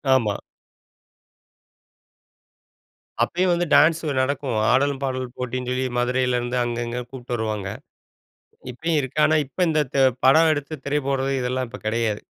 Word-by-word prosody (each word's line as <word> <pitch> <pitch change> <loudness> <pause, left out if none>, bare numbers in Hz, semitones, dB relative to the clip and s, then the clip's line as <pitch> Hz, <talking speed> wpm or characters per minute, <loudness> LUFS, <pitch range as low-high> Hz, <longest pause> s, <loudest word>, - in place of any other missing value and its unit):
ஆமா. 110 -6 +1 2.9
அப்பயும் 180 0 +1
வந்து 175 +1 0
டான்ஸு 160 +1 +4
நடக்கும். 130 -2 -1 0.2
ஆடலும் 140 +1 +2
பாடலும் 130 -1 -3
போட்டின்னு 125 0 -4
சொல்லி 130 +1 -1
மதுரைலேருந்து 125 0 0
அங்க 120 0 -3
இங்க 120 +1 -3
கூப்புட்டு 125 -2 -7
வருவாங்க. 105 -4 -3 1.0
இப்பயும் 160 +6 -2
இருக்கு, 135 +2 -6
ஆனா 155 - +3
இப்ப 140 - -23
இந்த 155 -1 +2
த்த 140 - -1 0.3
படம் 160 +5 +6
எடுத்து 145 +1 -3
திரை 145 +1 0
போடுறது, 135 0 0
இதெல்லாம் 125 +1 -1
இப்ப 125 +2 -9
கிடையாது. 110 -1 0
130 Hz, 130 wpm, -23 LUFS, 120-145 Hz, 2.9 s, படம்